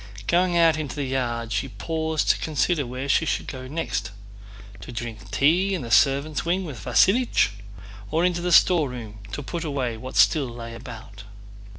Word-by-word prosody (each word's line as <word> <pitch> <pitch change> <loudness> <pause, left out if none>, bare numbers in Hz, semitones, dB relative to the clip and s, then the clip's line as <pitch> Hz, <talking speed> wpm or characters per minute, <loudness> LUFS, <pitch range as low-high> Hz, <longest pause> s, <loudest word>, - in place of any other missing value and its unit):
Going 175 0 +2
out 165 -2 +5
into 145 -5 -4
the 145 - -2
yard 120 -3 -2
she 110 +5 -1
paused 160 +1 -2
to - - -2
consider 155 -1 0
where 130 +3 -5
she 140 - +3
should 165 - -1
go 130 -1 -7
next—to 100 - -7
drink 115 -4 -7
tea 165 - +2
in 170 - -4
the 115 - -7
servants' 140 +7 +3
wing 180 +3 0
with 130 - -8
Vasílich, 235 - +3 0.6
or 165 +3 +1
into 175 -1 0
the 180 0 -1
storeroom 125 - +3
to 145 - -5
put 170 +4 -4
away 130 -7 -2
what 130 +3 -8
still 145 -6 +4
lay 115 -1 -8
about. 110 -4 -10
135 Hz, 170 wpm, -24 LUFS, 115-165 Hz, 0.6 s, out